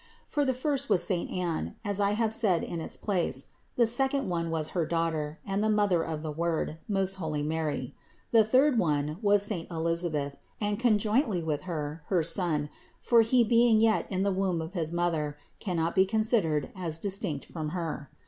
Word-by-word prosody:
For 290 - 0
the 260 -1 +1
first 280 +1 0
was 180 - +3
saint 180 -4 -1
Anne, 170 - -2
as 205 -1 -1
I 200 0 +2
have 220 0 +1
said 205 -7 +2
in 170 -1 -4
its - - -4
place; 175 - -1 0.3
the 240 - +4
second 270 +3 +1
one 170 -1 -1
was 160 -1 -1
her 175 - 0
Daughter 160 -2 -1
and 195 +1 -1
the 220 - +2
Mother 205 -5 +3
of 160 -1 -4
the 155 - -3
Word, 165 0 -2
most 195 -2 +1
holy 155 -2 -2
Mary; 150 -4 -2 0.4
the 225 -2 +6
third 255 +3 +4
one 150 -1 0
was 205 -1 +4
saint 200 -5 -3
Elisa 170 +1 -1
beth, 145 -2 -3 0.2
and 205 -1 -1
conjointly 215 - +2
with 160 +3 -3
Her, 155 -1 -4
her 180 -4 +2
son, 160 -3 0 0.3
for 235 -1 +5
he 235 +2 +4
being 230 0 +4
yet 220 -1 +2
in 190 0 0
the 200 -1 +1
womb 185 -2 0
of 160 +2 -5
his 165 -4 -2
mother, 165 -4 -1 0.2
cannot 170 -4 -1
be 190 0 +4
considered 200 - +1
as 170 -4 -2
dis 195 +3 -2
tinct 150 -9 -3
from 155 -3 -5
her. 160 -4 -4
180 Hz, 195 wpm, -29 LUFS, 160-210 Hz, 0.4 s, the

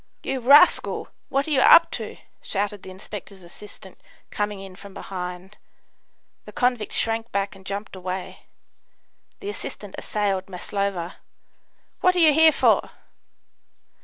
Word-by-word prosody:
"You 270 - -2
rascal! 285 +8 +5 0.2
what 275 +2 0
are - - -3
you 270 -3 +3
up 335 - +7
to?" - - -6 0.2
shouted 205 0 -3
the - - -10
inspector's 190 0 -10
assistant, 190 +1 -12 0.3
coming 205 -1 -2
in 195 -1 -10
from 200 0 -13
behind. 180 +1 -7 0.9
The - - -10
convict 245 -4 0
shrank 225 0 0
back 200 0 -2
and 190 - -15
jumped 200 0 -5
away. 185 0 -6 0.9
The 405 - -5
assistant - - -8
assailed 195 -3 -2
Maslova. 185 -1 -3 0.8
"What 365 0 +3
are - - +2
you 315 -3 +6
here 320 +1 +7
for?" - - +2
200 Hz, 135 wpm, -24 LUFS, 190-250 Hz, 0.9 s, up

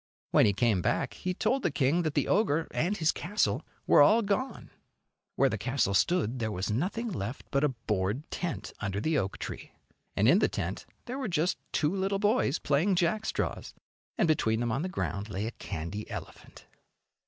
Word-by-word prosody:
When - - +6
he 100 - +3
came 105 -2 +2
back - - 0
he 185 0 -3
told 265 +8 +1
the - - +1
king 140 +4 +2
that 155 -3 -2
the - - +1
ogre 165 -6 +2
and 190 +6 0
his 160 -1 +3
castle 175 - 0 0.2
were - - +6
all 215 +10 +6
gone. 205 +7 -2 0.6
Where 135 - +4
the 110 -5 -2
castle 125 -2 0
stood 130 - +2
there 110 -2 -1
was 95 +1 -2
nothing 200 - -1
left 120 - -5
but 140 +1 +2
a 150 - +4
board 110 0 -2
tent 140 - -4
under 100 -1 -2
the 155 +6 +1
oak 95 -1 -3
tree, - - -7 0.4
and 105 - +3
in 175 +10 +6
the - - +3
tent - - -4 0.2
there 255 +3 -5
were 265 - -2
just 175 -1 0
two 155 +5 +1
little 195 +1 0
boys 205 - +2
playing 160 +7 +2
jackstraws, 180 +5 -1 0.4
and - - +3
between 115 -8 +2
them 120 -1 0
on 130 +6 0
the 185 - -2
ground 105 - -3
lay 100 +1 -3
a 115 - -3
candy 100 +1 -6
elephant. - - -9
145 Hz, 190 wpm, -29 LUFS, -, 0.6 s, When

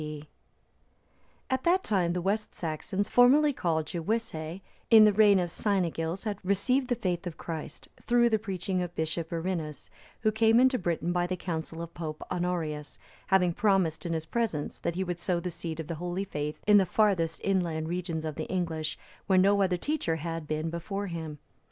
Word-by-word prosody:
D.] 150 -1 -6 1.2
At 260 -1 -1
that 365 +2 +3
time, 180 -5 +1
the 180 -1 -2
West 210 +3 -1
Saxons, 185 +5 -2
formerly 280 +4 +5
called 160 -8 0
Gewissae,(315) 170 -1 -3 0.3
in 225 -2 +9
the 210 - +5
reign 205 -1 +6
of 175 -2 -1
Cynegils,(316) 190 +1 -1
received 245 +8 +1
the 245 - +1
faith 180 -3 -2
of 170 - -6
Christ, 160 -2 -6 0.2
through 240 0 +4
the 220 - +3
preaching 190 -2 -2
of 175 -1 -5
Bishop 160 +1 -2
Birinus,(317) 165 -4 -4 0.3
who 215 -1 +3
came 225 +1 +4
into 255 0 +4
Britain 170 -1 -1
by 175 0 +1
the 185 0 -2
counsel 165 -1 -4
of 170 - -9
Pope 155 -2 -5
Honorius;(318) 170 -5 -2 0.3
having 180 -3 +3
promised 185 -6 +1
in 170 - -2
his 160 -1 -2
presence 205 -7 -2
that 170 - -2
he 190 - 0
would 175 -1 -4
sow 175 -1 0
the 180 +1 -4
seed 165 -1 -6
of 160 - -3
the 165 - -4
holy 180 +2 -2
faith 150 -5 -4
in 210 0 +7
the 190 -2 +4
farthest 185 -6 +2
inland 170 -5 0
regions 170 -2 -3
of 155 - -3
the 155 - -4
English, 165 -4 -2 0.3
where 190 -2 +4
no 200 +2 +5
other 185 -2 +2
teacher 290 - -1
had 165 0 -4
been 155 +1 -2
before 195 +4 -4
him. 160 -4 -5
175 Hz, 185 wpm, -29 LUFS, 165-200 Hz, 1.2 s, in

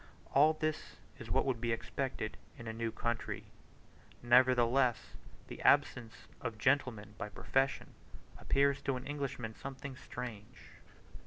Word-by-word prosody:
All 150 +3 +6
this 155 0 -3 0.2
is - - -8
what - - +2
would 125 -4 -1
be 120 -1 0
expected 115 -1 -3 0.2
in 120 - -9
a 110 - -3
new 115 0 -2
country; 120 +1 -2 0.8
nevertheless 125 0 +4 0.3
the - - -8
absence 115 -2 +2 0.2
of 110 -1 -4
gentlemen 115 -5 +1
by 105 - -3
profession 135 +5 0 0.5
appears 140 0 +2
to 135 - 0
an 125 - -6
Englishman 140 -6 -4
something 135 +2 -7
strange. 120 -2 -8
125 Hz, 130 wpm, -34 LUFS, 115-135 Hz, 0.8 s, All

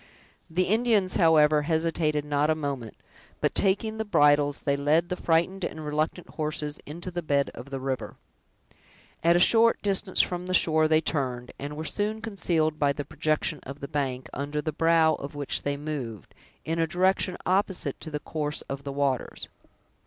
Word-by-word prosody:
The 175 +3 +1
Indians, 215 -2 +2
however, 155 -3 +5
hesitated 160 -1 0
not 145 +1 +1
a 155 - +3
moment, 140 -7 -4 0.4
but - - 0
taking 220 +3 +1
the - - +1
bridles, 145 -7 +3
they 140 - +1
led 150 +4 +2
the 180 - -1
frightened 180 +3 +1
and 155 -2 -4
reluctant 155 +3 -2
horses 150 -1 -3
into 170 +5 -7
the 175 0 -3
bed 140 -3 0
of 125 +4 -10
the 135 -1 -4
river. 130 -1 -4 1.1
At 170 +1 +5
a - - +4
short 230 +5 +5
distance 195 -1 0
from 180 0 +1
the 185 - +1
shore 155 -2 +4
they 155 0 +3
turned, 125 -6 -2
and 145 +2 -6
were 160 - -4
soon 210 +5 -1
concealed 170 -8 0
by 140 -1 +3
the 145 0 -5
projection 155 0 -1
of 140 +2 -9
the 140 - -6
bank, 130 -3 -2
under 145 +2 -3
the 155 +1 -3
brow 165 0 +4
of 140 +1 -6
which 145 -1 -1
they 145 0 -2
moved, 140 - -6 0.3
in 165 +1 -1
a 165 - +2
direction 185 +2 +1
opposite 190 0 0
to 160 - -6
the 150 -1 -3
course 150 -1 -4
of 140 0 -6
the 140 - -5
waters. 140 -2 -2
155 Hz, 180 wpm, -27 LUFS, 145-175 Hz, 1.1 s, however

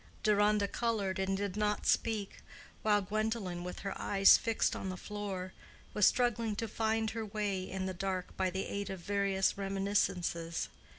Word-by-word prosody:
Deronda 210 -1 +3
colored, 205 -5 -1
and 190 0 0
did 200 -1 -3
not 210 -1 0
speak, 215 -3 0 0.4
while 210 -1 +3
Gwendolen, 210 -3 -2
with 180 0 -6
her 195 0 -3
eyes 195 -1 +7
fixed 225 -2 +1
on 190 - -4
the 185 - -4
floor, 195 -2 -5 0.4
was 210 - +5
struggling 235 -3 +1
to 225 +2 -2
find 220 0 0
her 225 0 -3
way 205 -2 -2
in 190 0 -3
the 190 - -2
dark 185 0 -3
by 190 -1 +1
the 190 +1 -3
aid 200 0 -4
of 190 -1 -5
various 200 +1 +1
reminiscences. 195 -4 -1
200 Hz, 165 wpm, -33 LUFS, 190-215 Hz, 0.4 s, eyes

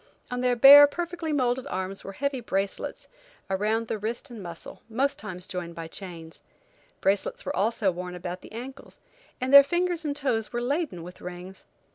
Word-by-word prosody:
On 250 0 -2
their 250 -1 +2
bare, 280 +4 +10
perfectly 340 +1 -4
modeled 255 -3 0
arms 190 +1 -4
were 195 - -7
heavy 280 +4 -2
bracelets, 195 -4 -3 0.4
around 215 +4 0
the 215 - -3
wrist 235 +5 -5
and 230 -3 -8
muscle, 170 -2 -9
most 265 +5 0
times 185 -4 -7
joined 175 -2 -6
by 165 -1 -6
chains. 165 -2 -9 0.6
Bracelets 195 +1 0
were - - -3
also 205 -1 +1
worn 180 0 -6
about 180 +1 -6
the - - -13
ankles, 255 +5 -9 0.4
and 260 +1 -2
their 280 - +13
fingers 345 +3 -1
and 290 -2 -2
toes 235 -7 -1
were 240 - -2
laden 270 - -2
with 180 +1 -11
rings. 180 +1 -9
225 Hz, 175 wpm, -26 LUFS, 185-275 Hz, 0.6 s, their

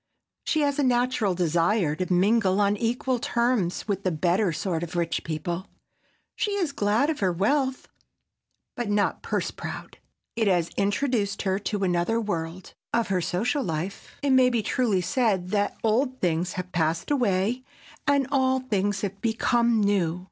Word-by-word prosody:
She 310 - +1
has 285 -1 +1
a - - +3
natural 245 -6 +1
desire 170 0 +1
to 185 +3 -3
mingle 195 +1 +3
on 205 0 +3
equal 240 +3 -1
terms 235 -8 0
with 200 -2 -1
the 185 - +2
better 180 +4 +1
sort 165 +1 -2
of 175 0 -6
rich 170 -1 -1
people. 170 +4 -4 0.7
She 415 - -1
is 365 -7 0
glad 225 +5 +1
of 310 - -5
her 190 -3 +2
wealth, 260 - 0 0.9
but 240 -3 -3
not 205 0 +1
purse - - -2
proud. - - -8 0.4
It 225 -2 +1
has 175 -3 +2
introduced 205 -1 0
her 190 -1 0
to 205 -1 -2
another 180 +5 +1
world. 180 -4 -4 0.2
Of 235 -3 0
her 185 -2 +1
social 230 - 0
life 170 +3 -5
it 280 - +2
may 260 -1 +6
be 235 -3 0
truly 215 -5 +1
said 190 -2 0
that 205 +1 0
old 255 +4 +1
things 175 +1 0
have 180 0 -5
passed 165 - 0
away 235 -2 +1 0.4
and 280 -1 +3
all 260 -1 +2
things 205 -5 -1
have 200 -1 -4
become 235 0 +2
new. 185 -4 +1
205 Hz, 160 wpm, -26 LUFS, 180-245 Hz, 0.9 s, may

